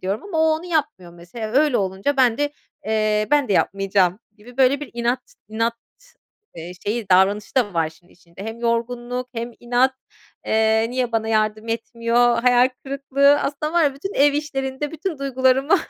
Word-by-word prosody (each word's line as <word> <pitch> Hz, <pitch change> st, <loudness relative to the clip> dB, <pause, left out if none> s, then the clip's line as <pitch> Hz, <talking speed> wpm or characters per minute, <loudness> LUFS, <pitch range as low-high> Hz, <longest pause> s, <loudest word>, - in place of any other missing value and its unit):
diyorum 195 Hz, +4 st, -3 dB
ama 385 Hz, -6 st, -4 dB
o -, -, +4 dB
onu 320 Hz, -, -10 dB
yapmıyor 295 Hz, -, -2 dB
mesela. 175 Hz, +6 st, -8 dB
Öyle 285 Hz, 0 st, +3 dB
olunca 195 Hz, +8 st, -1 dB
ben 245 Hz, -3 st, +3 dB
de, 290 Hz, 0 st, 0 dB, 0.3 s
eee, 215 Hz, -1 st, +1 dB
"Ben 290 Hz, -2 st, +3 dB
de -, -, +1 dB
yapmayacağım!" 195 Hz, -1 st, +1 dB, 0.2 s
gibi 235 Hz, +3 st, -16 dB
böyle 270 Hz, +1 st, +3 dB
bir 295 Hz, -, -7 dB
inat 240 Hz, +2 st, -2 dB
inat, 230 Hz, +2 st, -1 dB, 0.8 s
eee, 170 Hz, +2 st, -7 dB
şeyi 215 Hz, 0 st, -2 dB
davranışı 195 Hz, +3 st, +3 dB
da 230 Hz, -8 st, +1 dB
var 165 Hz, -1 st, +2 dB
işin 160 Hz, +3 st, -21 dB
içinde. 175 Hz, +2 st, -13 dB
Hem 225 Hz, +1 st, -6 dB
yorgunluk 240 Hz, +1 st, -2 dB
hem 235 Hz, +1 st, -4 dB
inat... 245 Hz, +2 st, +2 dB, 0.5 s
Eee, 220 Hz, 0 st, +2 dB
niye 250 Hz, -1 st, -2 dB
bana 220 Hz, -1 st, 0 dB
yardım 215 Hz, 0 st, 0 dB
etmiyor, 235 Hz, +1 st, +1 dB
hayal 250 Hz, 0 st, +5 dB, 0.2 s
kırıklığı... 280 Hz, +1 st, +2 dB
Aslında 300 Hz, +2 st, -3 dB
var 345 Hz, 0 st, +3 dB
ya, 280 Hz, -2 st, +1 dB
bütün 390 Hz, +9 st, -6 dB
ev 285 Hz, +1 st, +4 dB
işlerinde 285 Hz, -1 st, -3 dB
bütün 325 Hz, 0 st, -4 dB
duygularımı, 265 Hz, +1 st, +2 dB
240 Hz, 170 wpm, -21 LUFS, 215-275 Hz, 0.8 s, hayal